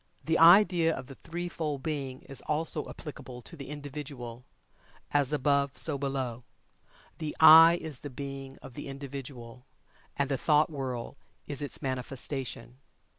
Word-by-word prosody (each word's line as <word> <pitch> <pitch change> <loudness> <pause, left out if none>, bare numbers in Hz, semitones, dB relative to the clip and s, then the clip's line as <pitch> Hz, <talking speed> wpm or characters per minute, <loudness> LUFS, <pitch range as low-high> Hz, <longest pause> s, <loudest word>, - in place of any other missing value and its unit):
This 160 +1 +1
idea 170 -1 +6
of - - -7
the 135 - -10
threefold 165 -3 -5
Being 135 -4 -4
is 135 - -5
also 150 0 -1
applicable 130 -5 -9
to - - -9
the 140 -2 -9
Individual 140 -5 -7 0.7
"as 145 -2 +3
above 140 -1 +1
so 145 -4 +3
below." 130 -4 -3 0.8
The 155 -2 -4
"I" 165 +2 +9
is 150 -6 -5
the 145 - -7
Being 135 0 -7
of 130 - -10
the 145 - -7
Individual, 135 -3 -8 0.5
and 140 - +1
the 135 -2 -1
thought 150 0 +3
world 130 -3 -5 0.3
is 145 -1 -5
its 145 - -4
manifestation. 130 -2 -4
140 Hz, 140 wpm, -29 LUFS, 130-150 Hz, 0.8 s, I